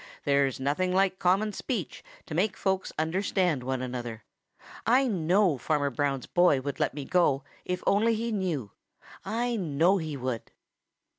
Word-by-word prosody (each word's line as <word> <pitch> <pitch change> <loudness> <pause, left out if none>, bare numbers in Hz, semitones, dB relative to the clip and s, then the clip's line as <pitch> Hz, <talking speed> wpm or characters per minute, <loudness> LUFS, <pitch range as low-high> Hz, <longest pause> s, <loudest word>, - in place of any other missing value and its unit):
There's 140 -2 +2
nothing 145 +7 0
like 190 0 +2
common 195 +4 +2
speech 195 - -4 0.2
to - - -7
make 190 +4 +1
folks 190 -1 -1
understand 175 -1 0
one 130 0 -2
another. 120 -3 -5 0.6
I 255 +5 +4
know 185 - +2
Farmer 145 0 0
Brown's 135 -1 -1
boy 175 -6 +3
would 140 +1 -5
let - - 0
me 145 -2 -5
go 145 -6 +2 0.2
if 180 0 -2
he - - -16
only 230 +2 +2
knew; 170 - -2 0.5
I 235 +4 -1
know 175 +2 +2
he 155 -3 -4
would." 125 -3 -4
170 Hz, 150 wpm, -28 LUFS, 140-195 Hz, 0.6 s, I